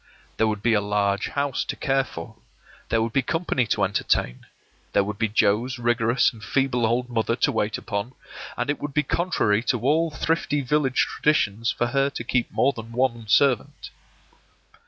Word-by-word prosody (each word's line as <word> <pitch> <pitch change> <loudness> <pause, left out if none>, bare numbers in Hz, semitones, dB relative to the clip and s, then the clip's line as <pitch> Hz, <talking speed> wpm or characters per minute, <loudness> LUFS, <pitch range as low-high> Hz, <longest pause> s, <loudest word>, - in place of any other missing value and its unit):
There 110 - +3
would 105 -1 -3
be 120 - +3
a 105 - +3
large 100 -1 0
house 140 -2 -1
to - - -4
care 135 -1 +1
for; 85 -10 -9 0.5
there 115 0 +2
would 115 -1 -3
be 135 - +3
company 140 -4 -1
to 105 - 0
entertain; 95 -9 -1 0.5
there 100 - +4
would 105 +1 -5
be 115 - +2
Joe's 110 +4 +1
rigorous 120 +2 +2
and 110 -2 -13
feeble 125 -1 +1
old 120 +2 0
mother 115 -1 0
to - - +1
wait 105 0 -1
upon; 100 +5 -4 0.4
and 145 - 0
it 145 - -4
would 145 -1 -5
be 150 - +3
contrary 135 - +1
to 125 - +1
all 155 +6 +2
thrifty 155 -1 -1
village 135 -1 +1
traditions 115 -7 +1
for 120 - -1
her 135 +3 +1
to 130 - -6
keep 120 0 -1
more 140 +2 +2
than 115 0 -9
one 120 -3 0
servant. 125 +3 +1
120 Hz, 180 wpm, -24 LUFS, 110-135 Hz, 0.5 s, there